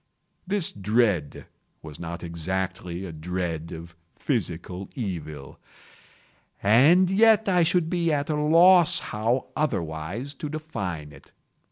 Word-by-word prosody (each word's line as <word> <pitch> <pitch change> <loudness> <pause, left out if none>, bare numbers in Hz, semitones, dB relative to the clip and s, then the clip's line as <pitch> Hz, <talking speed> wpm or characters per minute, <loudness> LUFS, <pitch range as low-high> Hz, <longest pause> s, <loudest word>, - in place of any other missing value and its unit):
This 195 -3 +2
dread 100 -6 0 0.4
was 75 -2 -10
not 85 +1 -6
exactly 90 +2 -4
a 90 - -7
dread 85 0 -4
of 85 0 -9 0.2
physical 90 +3 -3
evil—and 105 - -1
yet 220 +1 +4
I 180 -2 +3
should 165 0 +2
be 170 -1 0
at 145 -1 0
a - - 0
loss 165 +3 +5 0.2
how 115 +5 -1
otherwise 100 - -3
to 150 +1 -6
define 95 - -5
it. 70 -1 -17
100 Hz, 115 wpm, -25 LUFS, -, 0.4 s, loss